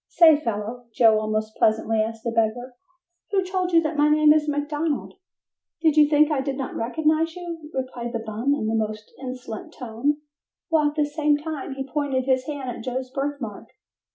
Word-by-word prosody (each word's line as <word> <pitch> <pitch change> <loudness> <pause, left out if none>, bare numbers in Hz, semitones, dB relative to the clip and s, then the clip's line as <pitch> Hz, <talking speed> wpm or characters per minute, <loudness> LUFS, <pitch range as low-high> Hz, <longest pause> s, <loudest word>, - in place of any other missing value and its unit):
"Say, 325 -3 +7
fellow," 235 -2 -4
Joe 220 -3 +5
almost 215 0 -2
pleasantly 220 0 +2
asked 225 0 -4
the 235 - -1
beggar, 230 +3 0 0.6
"who 390 -2 +2
told 365 -1 -1
you 330 -1 +5
that 310 0 -2
my 295 +1 +4
name 305 0 +6
is 305 -1 +1
McDonald?" 295 +1 -2 0.7
"Did 315 -2 +3
you 300 -1 +6
think 300 +1 +4
I 285 -3 +1
did 270 0 -3
not 270 -1 -4
recognize 315 +6 0
you?" 335 -4 -7
replied 255 -3 -4
the 235 - -1
bum 225 +6 0
in 215 - -2
a 220 - 0
most 215 -1 -3
insolent 250 -4 -7
tone 250 +5 -1 0.5
while 310 -2 +3
at 295 - -10
the 300 -1 +2
same 295 0 +1
time 295 -3 -5
he 270 0 -5
pointed 270 -2 -1
his 260 -1 +2
hand 280 -4 -4
at - - -9
Joe's 255 0 -4
birthmark. 275 -6 -4
275 Hz, 185 wpm, -24 LUFS, 230-300 Hz, 0.7 s, Say